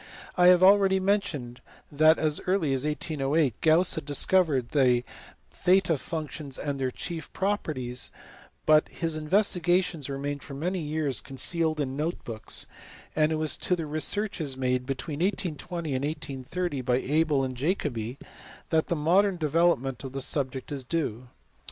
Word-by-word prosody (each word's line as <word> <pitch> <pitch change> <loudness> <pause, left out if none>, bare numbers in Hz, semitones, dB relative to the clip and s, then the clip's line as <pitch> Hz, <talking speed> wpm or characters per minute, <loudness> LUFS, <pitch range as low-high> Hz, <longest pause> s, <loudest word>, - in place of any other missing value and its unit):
I 180 -1 +5
have 180 0 +6
already 195 0 +6
mentioned 185 -12 -1 0.3
that 155 +2 +5
as 155 -1 0
early 180 -7 +1
as 135 +2 0
1808 150 -3 0
Gauss 165 +3 +5
had 160 - -4
discovered 145 -3 +2
the 125 -4 +3 0.5
theta 180 -2 +3
functions 150 -1 -5
and 140 -1 -3
their 130 -1 0
chief 165 +4 -6
properties, 140 - -1 0.6
but 155 0 +5
his 165 -2 -2
investigations 175 -2 +1
remained 140 +1 -4
for 140 - -9
many 180 +6 -2
years 150 -3 -1
concealed 155 +4 -1
in 140 -3 0
his 135 - -6
note 165 +3 -2
books; 110 -2 -1 0.5
and 155 0 +3
it - - +1
was 155 -1 -1
to 180 - 0
the 165 -2 -4
researches 155 -1 -1
made 125 -1 -1
between 145 +2 -4
1820 170 -4 -2
and 130 +1 -1
1830 145 +1 -3
by 125 -1 +1
Abel 145 +1 +1
and 130 -1 -3
Jacobi 130 - -2 0.5
that 160 -1 +2
the 170 - 0
modern 180 +5 +3
development 150 -5 +1
of 135 -1 -7
the 135 - -3
subject 130 0 -1
is 140 -2 -3
due. 130 -4 -3
150 Hz, 150 wpm, -27 LUFS, 135-170 Hz, 0.6 s, have